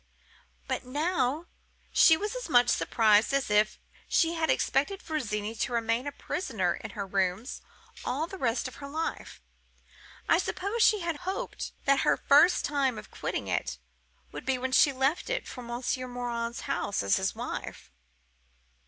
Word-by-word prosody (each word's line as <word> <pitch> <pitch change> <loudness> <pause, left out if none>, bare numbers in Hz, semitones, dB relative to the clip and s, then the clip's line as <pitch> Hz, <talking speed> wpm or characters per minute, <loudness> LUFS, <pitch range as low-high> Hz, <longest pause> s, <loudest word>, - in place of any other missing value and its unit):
But - - -2
now 295 +2 0 0.5
she 320 - +6
was 420 +6 -3
as - - -5
much 245 -3 +5
surprised 220 +2 +3
as 275 -6 0
if 210 +1 +3 0.3
she 330 -1 +2
had 325 -1 -1
expected 290 +9 +1
Virginie 220 -9 -3
to 230 +2 -2
remain 230 +3 0
a - - -2
prisoner 220 - -2
in - - -7
her 200 - -2
rooms 195 +5 -1 0.4
all 275 +6 -1
the 380 +3 -9
rest 240 0 0
of 255 - -10
her 280 - -8
life. 315 +3 -5 0.8
I - - +4
suppose 400 +5 -2
she 425 -2 +5
had 335 -2 -2
hoped 380 +5 -4
that 275 0 +4
her - - +3
first 295 +6 +5
time 275 -5 0
of - - -10
quitting - - -4
it - - -2 0.5
would - - -7
be 265 -1 0
when 260 +1 -3
she 280 +2 +6
left 270 - 0
it - - -2
for 250 - -8
Monsieur 245 +2 -3
Morin's 240 -1 -4
house 240 - -2
as 100 - +3
his - - -1
wife. 65 - -6
265 Hz, 160 wpm, -29 LUFS, 235-320 Hz, 0.8 s, she